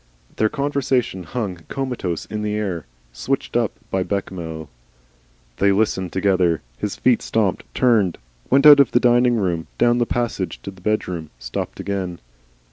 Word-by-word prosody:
Their 110 - +3
conversation 135 -7 0
hung 100 -1 -3
comatose 125 - -3
in 105 -1 -5
the 105 0 -1
air, 95 - -3 0.3
switched - - -3
up - - +1 0.2
by 95 - +1
Bechamel. 85 -5 -4 0.9
They 100 0 +4
listened 95 -3 0
together. 90 -4 +1 0.2
His - - -2
feet - - +2
stopped. - - 0
Turned. 110 -8 +3 0.3
Went 135 +3 +4
out 145 -1 +10
of 140 -4 +4
the 120 - +5
diningroom. 120 -9 +2
Down 120 0 +3
the 120 - +1
passage 115 -6 -2
to 100 - -6
the 95 -1 -17
bedroom. 90 -6 -2
Stopped - - -5
again. 95 -3 -3
100 Hz, 145 wpm, -21 LUFS, 90-120 Hz, 0.9 s, out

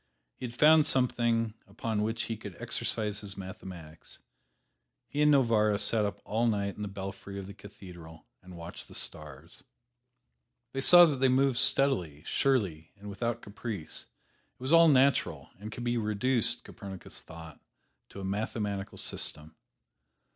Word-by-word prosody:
He 125 - -6
had 120 - -11
found 155 +2 +6
something 120 -4 +1
upon 105 +1 -3
which 110 +2 -1
he 115 - -3
could 100 -4 -10
exercise 105 -1 -1
his 100 -1 -7
mathematics. 95 -4 -10 0.9
He 145 - -2
and 150 0 +5
Novarra 110 -6 +3
sat 105 +1 +2
up 100 - -4
all 115 +3 0
night 100 -3 -1
in - - -9
the 105 - -3
belfry 100 0 -7
of 100 - -6
the 100 - -9
cathedral 90 -5 -13 0.2
and 90 -1 -12
watched 85 +1 -8
the - - -13
stars. 75 +1 -6 1.1
They 135 - -2
saw 175 +5 +9
that 150 -5 0
they 130 0 +3
moved 130 -1 +3
steadily, 90 - +2
surely 95 - 0
and 100 0 -9
without 115 +3 -3
caprice. 100 -6 -6 0.5
It - - -46
was 130 +5 0
all 165 0 +8
natural, 140 -2 +2
and 105 +2 -8
could 120 - -7
be 120 0 0
reduced, 115 +3 +1
Copernicus 100 -4 -9
thought, 80 -2 -12 0.5
to - - -10
a - - -5
mathematical 100 0 -3
system. 75 -3 -3
105 Hz, 155 wpm, -30 LUFS, 95-120 Hz, 1.1 s, saw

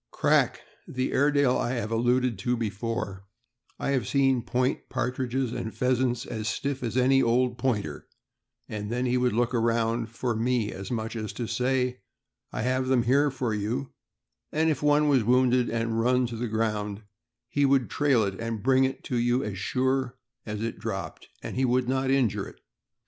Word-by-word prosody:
Crack, - - +2 0.3
the 130 0 -2
Airedale 145 -2 +3
I 120 - -1
alluded 120 0 +1
to 125 +5 0
before, 110 -2 -3 0.5
I - - -1
have 130 -7 0
seen 135 -3 +2
point 125 +4 -1
partridges 125 0 -1
and 120 -2 -4
pheasants 125 0 +1
as 110 -1 -4
stiff 140 +2 -2
as 120 0 -2
any 135 +1 +4
old 120 +1 +1
Pointer; 105 - -2 0.6
then 110 +4 -3
he 125 0 +1
would 125 0 +3
take - - -2
a - - +4
look 120 0 +1
around 115 0 +1
for 115 +1 -2
me, 115 -1 0
as 95 0 -7
much 115 -1 -3
as 110 -2 -4
to 120 - -4
say, 125 0 0 0.3
" - - -56
I 110 - -3
have 130 +1 0
them 130 -2 +3
here 140 +4 +3
for 125 -4 -2
you;" 115 +6 -2 0.6
and 160 +1 +2
if 140 - -2
one 150 0 +4
was 135 -5 +4
wounded 125 +1 +3
and 115 0 -1
run 125 +1 +2
on 115 -1 -6
the 120 - -1
ground, 105 -2 -2 0.4
he 145 +3 0
would 135 -2 +3
trail 140 -6 +2
it 100 -1 -3
and 115 -2 -4
bring 130 +1 +4
it 135 0 -4
to 125 - -2
you 120 +2 +2
as 100 -3 -4
sure 130 +3 0 0.3
as 105 0 -3
it 115 - -4
dropped, - - -5
and 130 - -2
would 125 0 +2
not 130 +1 0
injure 130 -6 +1
it. - - -14
125 Hz, 180 wpm, -27 LUFS, 115-130 Hz, 0.6 s, any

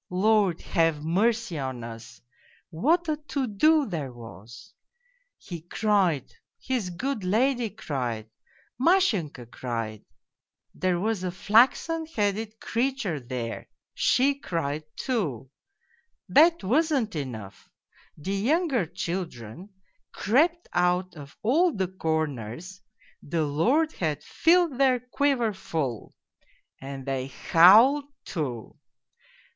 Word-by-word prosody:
Lord, 195 -1 +2
have 165 -4 +1
mercy 215 +1 +1
on 130 -3 -4
us, 115 -1 -10 0.5
what 295 - +2
a 305 -1 0
POLZUNKOV 300 0 -32
217 260 -7 -2
to 200 - -16
do 310 +1 +5
there 155 -9 -4
was! 115 -1 -12 0.6
He 170 -3 -8
cried, 180 - 0 0.3
his 245 -8 -2
good 225 +5 -3
lady 235 +5 +1
cried, 125 - -4 0.5
Mashenka 235 - +2
cried... 115 -4 -5 0.7
there 185 -2 0
was 210 -1 -1
a 185 - -1
flaxen 250 - +2
headed 215 -4 -2
creature 235 - -1
there, 120 -2 -6 0.2
she 275 +3 +3
cried 155 - -3
too.... 145 - -3 0.8
That 330 - +5
wasn't 265 - +1
enough: 115 -9 -7 0.5
the 185 +6 -4
younger 260 - +1
children 170 - -5 0.4
crept 330 - +1
out 180 +1 +1
of 145 -2 -12
all 320 +9 +3
the 190 -2 0
corners 160 - -3 0.4
(the 160 +1 -1
Lord 250 - +2
had 155 - -3
filled 335 -5 +2
their 260 -2 +4
quiver 250 -2 0
full) 145 - -4 0.7
and 135 -1 -7
they 135 -1 -2
howled 215 - +6 0.2
too 130 - -4
185 Hz, 110 wpm, -26 LUFS, -, 0.8 s, howled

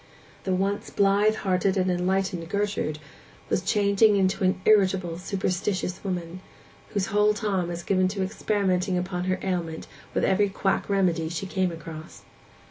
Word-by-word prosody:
The 190 -1 +1
once 195 +2 -1
blithe 200 +2 +3
hearted 190 -1 0
and 185 0 +2
enlightened 180 -1 -1
Gertrude 200 -6 -1 0.5
was - - +1
changing 205 +2 +3
into 190 0 +1
an 185 0 +2
irritable, 185 -5 +3
superstitious 185 -1 -2
woman, 180 -2 -4 0.5
whose 200 -3 -1
whole 210 0 +4
time 195 -4 -1
was 170 0 -5
given 185 -1 +2
to 195 0 -2
experimenting 190 -2 0
upon 180 0 -2
her 185 0 0
ailment 170 -4 -2 0.3
with - - +2
every 200 +1 +3
quack 195 +1 -1
remedy 175 -5 +1
she 170 +3 -4
came 185 -1 0
across. 160 -1 -9
190 Hz, 145 wpm, -26 LUFS, 180-200 Hz, 0.5 s, whole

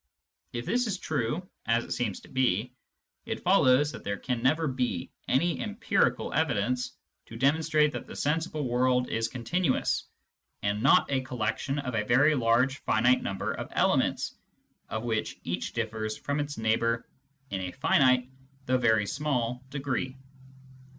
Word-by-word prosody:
If 120 0 -4
this 240 +6 +1
is 200 -3 -1
true, 155 +2 -2 0.2
as 115 +1 +2
it - - -11
seems 110 -6 -2
to - - -15
be, 125 -2 0 0.5
it - - -4
follows 130 +4 +4
that - - -9
there 100 - -2
can 125 0 -3
never 155 +6 +2
be 125 -9 -2 0.2
any 170 +5 +2
empirical 215 +1 0
evidence 125 -3 0 0.3
to 115 - -9
demonstrate 150 +3 +3
that - - -6
the - - -9
sensible 155 -1 -1
world 125 +1 +2
is 115 0 0
continuous, 130 +6 0 0.6
and 100 +1 0
not 135 +2 +5
a 135 -1 +2
collection 125 +2 -2
of 135 -3 -3
a 110 -2 +1
very 135 +8 +4
large 125 +1 +2
finite 125 +4 +3
number 95 -1 -2
of - - -5
elements - - +1 0.6
of 110 0 -3
which 110 -2 -2
each 85 +1 -3
differs 110 -2 -3
from 145 +1 -2
its 145 0 -3
neighbour 115 +1 +1 0.4
in 95 -1 -2
a 90 -1 -4
finite 130 0 +3 0.4
though 130 0 +2
very 110 -4 +3
small 125 -2 -1
degree. 135 -2 -3
125 Hz, 150 wpm, -28 LUFS, 115-145 Hz, 0.6 s, not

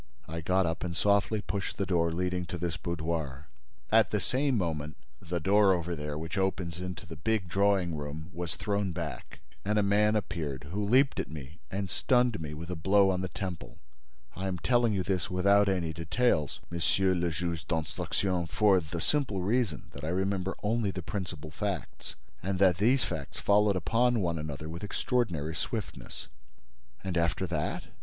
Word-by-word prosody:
I 80 +1 -4
got 95 +3 +2
up 80 0 -2
and 85 -2 -3
softly 100 +1 +3
pushed 100 +1 -3
the 100 - 0
door 85 -2 +2
leading 90 +1 -1
to 90 - -4
this 85 -1 -2
boudoir. 80 -4 -3 0.5
At 110 0 +6
the 105 - +1
same 135 +3 +1
moment, 75 -6 -2 0.2
the 85 +1 -2
door 100 +3 +5
over 85 -1 -1
there, 75 -1 -4
which 80 +5 -3
opens 90 -3 -1
into 90 -1 -5
the 80 -2 -9
big 100 +4 0
drawing 95 -2 +2
room, 75 +3 -6
was 85 -1 -3
thrown 100 -3 -1
back - - -6 0.2
and 105 +2 +1
a 105 - +4
man 105 +2 +3
appeared 80 -10 -2
who 105 +3 -1
leaped 130 +7 +4
at - - -2
me 75 0 -9
and 100 0 -2
stunned 125 +2 +2
me 75 -1 -5
with 85 +3 -6
a - - -2
blow 95 +4 +4
on 90 -1 -1
the 95 - -1
temple. 90 -4 -5 0.6
I 95 +1 -3
am 95 -1 -1
telling 120 +5 +3
you 95 -3 0
this 90 -1 -1
without 100 +2 +4
any 85 -4 0
details, 85 - +1
Monsieur 95 +3 +2
le 90 -1 +1
Juge 85 -3 -3
d'Instruction, 85 +3 -1
for 100 +2 +4
the 80 0 -5
simple 125 - 0
reason 110 -4 0
that 70 - -10
I 80 - -1
remember 95 +1 0
only 110 0 +1
the 95 -1 -4
principal 85 -6 -5
facts, 100 +1 -4 0.3
and 95 +1 -1
that 90 -3 +5
these 125 +7 +4
facts 70 -3 -4
followed 105 0 +4
upon 115 +7 +2
one 85 -4 0
another 75 0 -5
with 85 +3 -6
extraordinary 100 - 0
swiftness." - - -5 0.8
"And 90 -3 0
after 85 +3 +1
that? 80 -4 -2
90 Hz, 180 wpm, -30 LUFS, 80-100 Hz, 0.8 s, At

